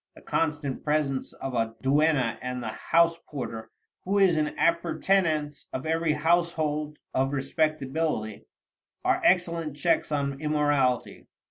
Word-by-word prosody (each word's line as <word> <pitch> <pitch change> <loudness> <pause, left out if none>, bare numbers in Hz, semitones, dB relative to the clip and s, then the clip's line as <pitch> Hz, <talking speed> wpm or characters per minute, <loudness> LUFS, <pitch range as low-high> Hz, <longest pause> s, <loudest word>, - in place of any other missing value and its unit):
The - - -14
constant 150 -4 -1
presence 150 -3 0
of 135 - -6
a 115 -1 -1
duenna, 135 -4 +2
and 125 -1 -4
the - - -3
house 170 0 +2
porter, 115 -6 -6 0.3
who 195 +2 0
is 190 -4 +5
an 150 -1 0
appurtenance 170 -3 +1
of 130 - -4
every 165 0 +1
household 155 -2 0 0.2
of 135 +2 +1
respectability, 145 -5 -1 0.6
are - - +2
excellent 170 -5 +2
checks 165 0 +1
on 140 -1 -1
immorality. 145 -5 0
150 Hz, 125 wpm, -27 LUFS, 135-165 Hz, 0.6 s, is